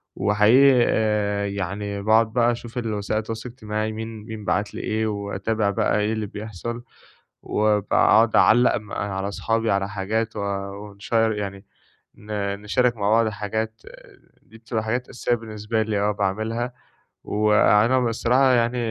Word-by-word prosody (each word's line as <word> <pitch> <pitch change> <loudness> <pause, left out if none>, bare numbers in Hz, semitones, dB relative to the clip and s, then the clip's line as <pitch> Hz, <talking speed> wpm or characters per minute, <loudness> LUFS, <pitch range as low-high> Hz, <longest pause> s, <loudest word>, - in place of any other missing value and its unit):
وحقيقي 120 +6 +5
آآ 105 -2 0
يعني 100 +1 -4
باقعد 110 +1 +3
بقى 120 -1 +3
أشوف 120 +1 -7
الوسائل 110 -2 -2
التواصل 115 +2 -6
الاجتماعي 110 -2 -4
مين 110 -1 -7
مين 110 -3 -8
بعت 105 +1 -1
لي - - -5
إيه، 110 0 -1
وأتابع 100 +1 -2
بقى 100 +1 +1
إيه 105 +2 0
اللي 110 -1 -2
بيحصل، 110 +4 -6 0.6
وباقعد 110 +1 +3
أعلّق 120 +2 +5
م 105 -1 -11
على 100 -1 -3
أصحابي 115 +2 -1
على 100 0 0
حاجات 105 +3 -2
و - - -2 0.4
ونشيّر 110 +2 0
يعني 100 -1 -5 0.5
ن 100 -1 -4
نشارك 120 +3 +1
مع 100 -1 0
بعض 115 0 +4
حاجات، 110 +1 -4 0.6
دي 110 +3 -17
بتبقى 115 -1 -3
حاجات 120 +3 -2
أساسية 120 -1 -1
بالنسبة 110 0 -3
لي 105 -2 -1
آه 105 +1 +1
باعملها 110 +5 -2 0.5
وأنا 105 +3 +3
بصراحة 125 +2 +2
يعني 120 0 +1
110 Hz, 145 wpm, -23 LUFS, 105-115 Hz, 0.6 s, وحقيقي